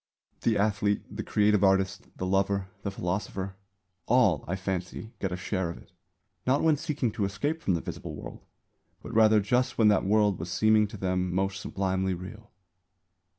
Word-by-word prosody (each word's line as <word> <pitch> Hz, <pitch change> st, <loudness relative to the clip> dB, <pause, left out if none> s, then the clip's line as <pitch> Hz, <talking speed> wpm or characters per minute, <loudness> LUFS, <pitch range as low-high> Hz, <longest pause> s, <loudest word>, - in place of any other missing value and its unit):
The 115 Hz, -2 st, +2 dB
athlete, 105 Hz, 0 st, +1 dB
the -, -, -3 dB
creative 105 Hz, -1 st, +2 dB
artist, 95 Hz, -1 st, +2 dB
the 95 Hz, -, -3 dB
lover, 95 Hz, 0 st, +1 dB
the 100 Hz, -, -2 dB
philosopher 95 Hz, 0 st, -3 dB, 0.5 s
all, 110 Hz, -, +4 dB
I 90 Hz, -, -1 dB
fancy, 95 Hz, +3 st, -4 dB
get 95 Hz, -, -2 dB
a -, -, -1 dB
share 95 Hz, -1 st, -2 dB
of 85 Hz, -, -6 dB
it, -, -, -17 dB, 0.6 s
not 135 Hz, +3 st, +3 dB
when 160 Hz, -2 st, +5 dB
seeking 145 Hz, -6 st, -2 dB
to 105 Hz, -, -2 dB
escape 145 Hz, +12 st, -2 dB
from 95 Hz, -, +1 dB
the 85 Hz, -, -2 dB
visible -, -, -6 dB
world; -, -, -9 dB, 0.6 s
but -, -, -8 dB
rather 110 Hz, -1 st, +6 dB
just 125 Hz, +5 st, +1 dB
when 110 Hz, -2 st, +5 dB
that 105 Hz, -, +3 dB
world 105 Hz, -1 st, +2 dB
was 85 Hz, -, -5 dB
seeming 110 Hz, +3 st, +3 dB
to 105 Hz, -, -9 dB
them 90 Hz, -1 st, -1 dB
most 95 Hz, +1 st, -1 dB
sublimely 95 Hz, -1 st, -1 dB
real. 105 Hz, +5 st, -10 dB
100 Hz, 175 wpm, -28 LUFS, 95-110 Hz, 0.6 s, rather